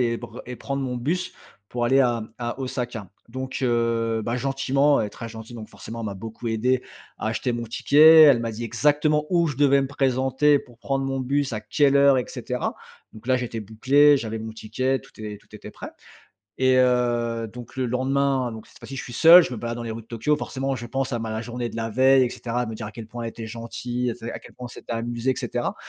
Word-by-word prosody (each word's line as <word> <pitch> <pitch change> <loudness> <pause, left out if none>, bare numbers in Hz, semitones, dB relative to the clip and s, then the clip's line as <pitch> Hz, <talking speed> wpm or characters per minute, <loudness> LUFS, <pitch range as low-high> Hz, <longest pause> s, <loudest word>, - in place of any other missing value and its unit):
et 115 -1 +1
br - - -9
et 125 -1 -6
prendre 140 0 -3
mon 125 -1 -3
bus 170 +9 -2 0.4
pour 120 -1 -2
aller 135 +3 +4
à 120 -3 +2 0.2
à 120 +1 -4
Osaka. 120 -6 -4 0.2
Donc, 130 +2 -5
heu, 115 -2 +1
ben 115 +2 -1
gentiment. 135 +2 +2
Elle 105 - 0
est - - -16
très 115 +2 -8
gentille 110 +1 -10
donc, 110 -1 -8
forcément, 115 +1 -9
elle 110 - -4
m'a 100 - -4
beaucoup 115 +4 -7
aidé, 125 +3 +1 0.4
à - - -4
acheter 125 - -1
mon 120 0 -3
ticket, 155 +7 +7
elle 140 -6 +7
m'a 115 -1 -2
dit 115 +2 -6
exactement 150 +6 +2
où 170 -2 +2
je 145 -5 -3
devais 140 -1 +4
me - - -1
présenter 135 +1 +2
pour 120 -3 -15
prendre 135 0 -2
mon 135 0 -2
bus, 140 +1 0
à 105 - -3
quelle 140 +6 +2
heure, 140 -1 +6
et 125 - 0
cetera. 125 -1 -3 0.4
Donc 110 +2 -14
là, 130 - +3
j'étais 120 -3 -4
bouclé. 135 +8 +4
J'avais 110 -3 -4
mon 110 0 -6
ticket. 130 +5 -1
Tout - - -18
est 105 -1 -6
tout - - -22
était - - -9
prêt. - - -9 0.7
Et, 130 0 +4
heu, 120 -2 +1
donc 120 +1 -11
le 130 - 0
lendemain, 130 0 0
donc, 110 -1 -9
cette - - -19
fois-ci, 135 - -9
je - - -4
suis 120 - -9
seul. 170 +6 +9
Je - - -4
me - - -4
balade 115 +1 -4
dans 120 - -5
les 115 - -5
routes 110 0 -6
de - - -35
Tokyo. 135 +6 0
Forcément, 135 -1 -3
je 120 - -7
pense 135 +2 -2
à 120 - 0
ma 110 -1 -3
journée 120 +1 -4
de - - -9
la 115 0 -2
veille, 130 +3 +5
et 120 - -2
cetera, 120 0 -3
de - - -5
me - - -6
dire 110 0 -6
à 105 - -8
quel 115 -1 -9
point 120 +2 -7
elle 115 - -3
était 115 0 -8
gentille, 120 +2 -4
et - - -2
tu 115 - -12
sais, 115 - -5
à - - -6
quel - - -16
point 125 - -8
on - - -9
s'était 120 - -8
amusés, 120 +2 -2
et - - -9
cetera. - - -2
125 Hz, 255 wpm, -24 LUFS, 115-135 Hz, 0.7 s, seul